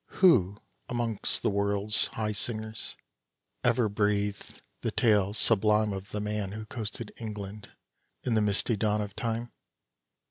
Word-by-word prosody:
Who 100 - +5 0.3
amongst 120 -4 0
the - - +2
world's 100 +1 +2
high 110 -1 -2
singers 110 +2 -4 0.7
ever 120 -3 +3
breathed 105 -1 -1 0.2
the - - 0
tale 105 -4 +3
sublime 105 -1 +3
Of 95 +2 -6
the 105 - -3
man 105 -2 -2
who 110 +1 -6
coasted 110 0 -6
England 105 -2 -7 0.5
in 125 - 0
the 110 - +3
misty 105 +2 +2
dawn 105 0 +1
of 105 -1 -6
time? 115 +1 -3
105 Hz, 135 wpm, -29 LUFS, 100-110 Hz, 0.7 s, Who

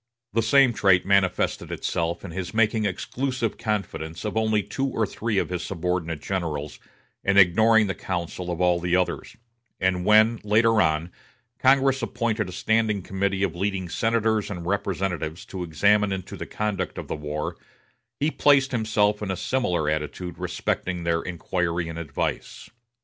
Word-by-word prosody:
The 115 - +2
same 130 +2 +5
trait 95 -5 +3
manifested 95 -2 +1
itself 85 0 -2
in - - -7
his 95 +4 -5
making 110 -1 +2
exclusive 125 +4 -2
confidants 100 -6 -3
of 105 - -3
only 110 -1 +2
two 135 +6 -2
or 115 -4 0
three 110 +1 -3
of - - +1
his 90 -1 -3
subordinate 85 -3 -3
generals, 80 -6 -3 0.4
and 100 0 +2
ignoring 110 +4 +6
the 95 - -1
counsel 90 -1 -4
of 85 -1 -3
all 90 -1 +3
the 90 +1 0
others; 90 +4 -1 0.4
and 95 -1 +1
when, 110 +3 +5
later 110 +1 +4
on, 80 +1 0 0.5
Congress 135 0 +4
appointed 115 -5 -1
a - - -7
standing 110 +1 +1
committee 95 +1 -1
of 90 -4 -1
leading 95 -1 -2
senators 110 0 +1
and 90 -4 -6
representatives 90 -3 -2
to 95 - -7
examine 100 +5 +2
into 95 -2 -5
the - - -7
conduct 105 -4 -3
of - - -6
the - - -3
war, 75 0 -4 0.6
he 150 +2 +1
placed 140 -3 +4
himself 105 -3 +1
in 105 - -3
a 95 - -2
similar 90 -13 0
attitude 75 +3 -3
respecting 90 -2 -2
their 85 0 +1
inquiry 85 -1 -2
and 80 0 -6
advice. 75 -4 -4
95 Hz, 160 wpm, -25 LUFS, 85-110 Hz, 0.6 s, ignoring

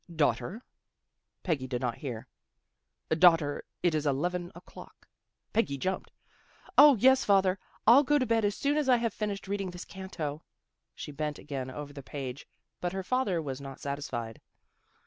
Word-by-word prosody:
" - - -13
Daughter." 145 - -2 0.8
Peggy 150 -8 -1
did 125 -1 -2
not 125 -2 -2
hear. 125 -7 -5 0.5
" 65 0 -53
Daughter, 160 -3 +4 0.2
it 175 -2 +3
is 155 -1 0
eleven 175 +6 -1
o'clock." 175 - -14 0.5
Peggy 210 -11 +1
jumped. 185 +7 -3 0.3
" - - -25
O, 290 -1 +10
yes, 260 +4 +5
father. 195 -2 +3 0.3
I'll 240 +5 +8
go 295 +1 +3
to 260 - +1
bed 225 -1 +2
as 205 0 +1
soon 285 +1 0
as 295 -3 +1
I 250 - +6
have 230 -2 -1
finished 205 -2 -4
reading 195 -1 -2
this 175 0 -8
canto." 165 -6 -6 0.5
She - - -7
bent 150 0 -3
again 135 -3 -5
over 145 +2 -7
the 140 - -8
page, 135 -1 -7 0.3
but 175 0 -2
her 190 0 -3
father 210 -5 0
was 135 -1 -5
not 135 -1 -8
satisfied. 130 -5 -5
170 Hz, 170 wpm, -30 LUFS, 140-205 Hz, 0.8 s, O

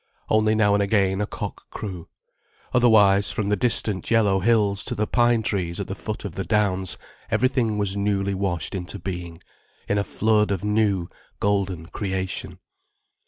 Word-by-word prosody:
Only 110 0 +3
now 105 -2 +3
and 100 - +3
again 100 -1 +1
a 105 - -1
cock - - -7
crew. 95 -6 -7 0.7
Otherwise, 105 -5 +5
from 100 -2 -2
the 105 - +3
distant 105 -3 +2
yellow 105 -4 +3
hills 105 -1 +2
to 125 - -2
the 105 0 0
pine 120 0 +2
trees 90 -5 -2
at - - -2
the - - -5
foot - - -6
of - - -5
the - - -3
downs, 95 -3 0 0.3
everything 125 -4 +1
was 100 -1 0
newly 100 -1 0
washed 95 -4 -2
into 95 +1 -4
being, 90 -3 -6 0.4
in 100 - +1
a - - 0
flood 105 0 +1
of 100 -2 -2
new, 105 -4 +1 0.3
golden 95 -4 0
creation. 95 0 -4
100 Hz, 165 wpm, -23 LUFS, 95-110 Hz, 0.7 s, Otherwise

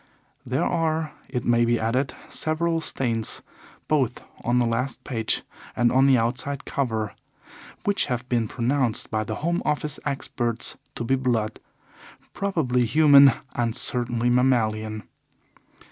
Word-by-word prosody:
There 130 +5 -1
are, 160 -2 0 0.2
it 125 -2 -3
may 120 0 +3
be 120 0 +2
added, 125 +5 0
several 165 +1 -1
stains, 115 -7 -1 0.4
both 135 -6 0 0.2
on 120 +1 +1
the 120 - +3
last 120 +2 -2
page 115 -5 -1 0.3
and 120 -1 +3
on 130 +2 +4
the 135 -2 +5
outside 125 +4 -2
cover 110 -6 -2 0.7
which 205 -1 +2
have 125 -2 -3
been 120 -3 0
pronounced 125 0 0
by 110 0 0
the 110 0 -4
Home 170 0 +1
Office 150 0 -1
experts 120 -4 -1 0.2
to - - -4
be 120 - 0
blood 120 -5 0 0.7
probably 155 -11 0
human 140 +1 +7 0.2
and 120 -1 -1
certainly 120 -1 0
mammalian. 110 -4 +1
125 Hz, 130 wpm, -24 LUFS, 115-140 Hz, 0.7 s, human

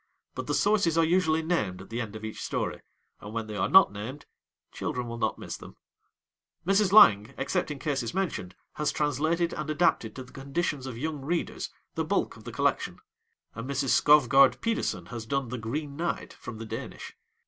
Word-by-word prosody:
But - - -5
the - - 0
sources 200 -6 +3
are 165 - +5
usually 160 -2 +2
named 110 - -1
at 95 +3 -12
the 120 +1 -2
end 110 -2 -6
of 110 0 -6
each 110 - -6
story, - - -2 0.4
and 105 +1 -9
when 115 -1 -2
they 105 -1 -7
are 100 0 0
not 190 - +7
named 115 +8 -7 0.5
children 125 -1 -3
will 115 0 -6
not - - 0
miss - - -6
them. - - -13 0.9
Mrs. 195 +1 +3
Lang, 110 - +7
except 180 -4 -1
in 150 - -4
cases 135 -5 -2
mentioned, 170 - -3 0.2
has 150 - 0
translated 160 +4 0
and 150 0 -4
adapted 155 -8 +1
to 130 - -6
the 130 - -17
conditions 140 0 -2
of 125 -3 -6
young 150 +2 -3
readers 170 +4 -2 0.2
the - - -1
bulk - - 0
of - - -15
the - - -6
collection, - - 0 0.6
and 115 +4 -6
Mrs. 140 -1 -1
Skovgaard 135 -2 +6
Pedersen 230 0 -1
has 115 -2 -6
done 135 -1 -1
'The 125 0 -4
Green 140 +6 -4
Knight' 170 +3 -3
from 115 - -9
the 115 - -7
Danish. - - -7
140 Hz, 190 wpm, -28 LUFS, 115-165 Hz, 0.9 s, not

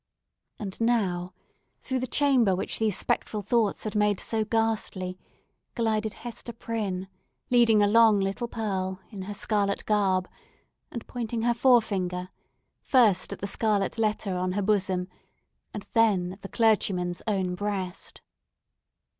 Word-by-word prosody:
And 200 0 -6
now, 190 -6 0 0.4
through 260 -2 -2
the 255 - -3
chamber 255 -9 +3
which 185 - -3
these 215 -4 +1
spectral 210 -1 -1
thoughts 220 0 +1
had 215 - -4
made 210 -2 +2
so 220 -1 -1
ghastly, 215 -4 -1 0.6
glided 220 -2 0
Hester 235 0 -7
Prynne 205 -5 -3 0.4
leading 230 -4 +5
along 215 0 +5
little 195 +5 -2
Pearl, 190 -5 -3
in 200 -3 -7
her 205 +2 -6
scarlet 200 -1 0
garb, 190 -3 +2 0.6
and 235 - -7
pointing 235 -2 -4
her 240 0 +3
forefinger, 200 -8 +2 0.5
first 220 -8 +3
at - - -7
the - - -2
scarlet 210 +1 0
letter 215 -3 0
on 180 0 -1
her 205 +1 -1
bosom, 190 -3 +1 0.6
and 210 - -6
then 200 -6 +3
at 195 - -15
the 195 - -8
clergyman's 190 -6 +1
own 190 -4 0
breast. 190 -2 -4
210 Hz, 135 wpm, -27 LUFS, 190-225 Hz, 0.6 s, leading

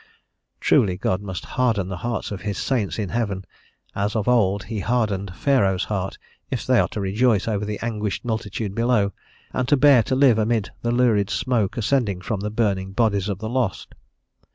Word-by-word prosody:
Truly 100 -10 +3
God 95 +1 -1
must 95 -3 -6
harden 115 -7 0
the 95 -1 -5
hearts 120 +4 -3
of 100 - -5
his 105 -2 -3
saints 120 -8 -1
in 105 -4 -2
heaven 100 -5 -2 0.5
as 100 +2 -1
of 110 -3 -1
old 100 -5 +3
he 110 -1 -4
hardened 100 -5 -1
Pharaoh's 100 -9 +2
heart, 95 -1 -3 0.3
if - - -3
they - - +4
are - - +3
to - - -6
rejoice 105 +2 +1
over 105 -2 -1
the 105 0 -3
anguished 105 -1 -3
multitude 110 -3 -3
below, 115 -3 +1 0.4
and 130 -1 -1
to 145 - +4
bear 135 -2 +6
to 130 - -1
live 130 -4 +5
amid 110 -1 0
the 120 - 0
lurid 115 -5 +2
smoke 110 -2 0
ascending 115 -5 0
from 105 +1 -3
the 105 +2 -3
burning 100 -4 -1
bodies 100 -3 +1
of 100 - -2
the 110 +2 -5
lost. 120 -5 -2
105 Hz, 185 wpm, -23 LUFS, 100-120 Hz, 0.5 s, bear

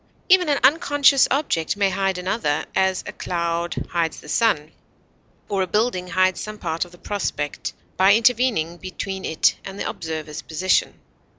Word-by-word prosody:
Even 365 -3 +5
an 285 - +2
unconscious 285 -1 +5
object 230 - 0
may 200 -1 +2
hide 195 0 0
another; 180 -5 -1
as, 190 -1 +1
a - - -7
cloud 170 -1 -3
hides 165 -2 -1
the - - -14
sun, 155 -8 +1 0.8
or 200 -2 -1
a 185 - 0
building 210 -3 0
hides 185 +1 +1
some 215 0 -6
part 165 -2 -2
of 175 - -16
the 175 - -15
prospect 170 -8 -3 0.2
by 195 +2 +6
intervening 230 -8 +2
between 190 +1 -6
it 160 - +2
and 195 +1 -8
the - - -2
observer's 155 -1 -5
position. 175 +4 0
185 Hz, 160 wpm, -22 LUFS, 170-215 Hz, 0.8 s, by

